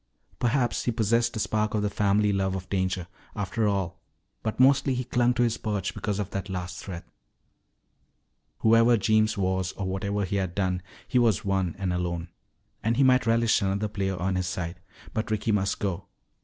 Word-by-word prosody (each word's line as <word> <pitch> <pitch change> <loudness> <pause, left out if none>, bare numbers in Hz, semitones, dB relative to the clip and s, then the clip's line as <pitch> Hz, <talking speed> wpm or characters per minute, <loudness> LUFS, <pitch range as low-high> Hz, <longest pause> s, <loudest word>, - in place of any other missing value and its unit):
Perhaps 120 0 +1
he 120 - +2
possessed 115 +1 +1
a - - -2
spark 110 0 0
of 105 - 0
the 105 - +1
family 105 0 +2
love 95 -1 0
of 95 0 -5
danger, 95 -2 0 0.3
after 105 +1 -1
all, 100 -4 -1 0.4
but 110 +1 -3
mostly 135 0 +4
he 125 - -1
clung 120 0 +2
to 120 - +3
his 115 -1 +1
perch 105 -3 -2
because 105 -2 -2
of 105 -3 -3
that 100 0 -4
last 90 0 -5
threat. 90 -4 -7 1.6
Whoever 115 +1 +5
Jeems 110 +1 +2
was 95 -1 0
or 100 - -4
whatever 100 +2 -1
he 100 +2 -1
had 95 -2 -2
done, 95 -2 0 0.3
he 125 - +2
was 115 -6 +2
one 95 -3 0
and 95 -2 -1
alone. 85 -1 -2 0.5
And 115 +2 0
he 140 - +5
might 130 -3 +4
relish 115 0 +3
another 100 +2 0
player 95 -2 -2
on 95 +1 0
his 90 -1 -1
side. 90 0 -4 0.3
But 110 0 -2
Ricky 110 +1 0
must 100 -2 +1
go. 95 -4 -3
100 Hz, 185 wpm, -27 LUFS, 95-115 Hz, 1.6 s, Whoever